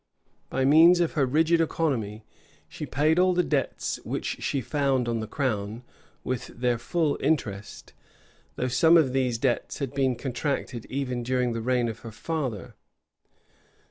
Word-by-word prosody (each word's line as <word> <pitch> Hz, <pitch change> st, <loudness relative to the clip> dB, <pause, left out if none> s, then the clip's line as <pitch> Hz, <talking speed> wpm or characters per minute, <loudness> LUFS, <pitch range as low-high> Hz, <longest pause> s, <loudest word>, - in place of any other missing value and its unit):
By 130 Hz, 0 st, 0 dB
means 165 Hz, +5 st, +7 dB
of 170 Hz, -2 st, +1 dB
her 140 Hz, -3 st, +1 dB
rigid 160 Hz, +5 st, +3 dB
economy, 115 Hz, -10 st, -1 dB, 0.4 s
she -, -, -7 dB
paid 155 Hz, +5 st, +2 dB
all 185 Hz, 0 st, +4 dB
the 180 Hz, -, +3 dB
debts 145 Hz, -5 st, -1 dB
which -, -, -4 dB
she 140 Hz, -, -1 dB
found 135 Hz, -1 st, 0 dB
on 115 Hz, -1 st, -1 dB
the 110 Hz, -, -4 dB
crown, 115 Hz, -4 st, -2 dB, 0.4 s
with 130 Hz, -2 st, -3 dB
their 120 Hz, -1 st, -1 dB
full 155 Hz, +2 st, 0 dB
interest; 110 Hz, -9 st, -2 dB, 0.6 s
though 125 Hz, -, -1 dB
some 160 Hz, +7 st, +5 dB
of 140 Hz, -6 st, +3 dB
these 130 Hz, -3 st, +1 dB
debts 120 Hz, 0 st, -1 dB
had 140 Hz, -3 st, -4 dB
been 135 Hz, -2 st, +1 dB
contracted 125 Hz, -1 st, -3 dB
even 130 Hz, -2 st, -3 dB
during 125 Hz, 0 st, 0 dB
the 115 Hz, -, -3 dB
reign 125 Hz, 0 st, +1 dB
of 115 Hz, -1 st, -5 dB
her 115 Hz, -, -9 dB
father. 130 Hz, -3 st, -4 dB
130 Hz, 155 wpm, -26 LUFS, 120-150 Hz, 0.6 s, means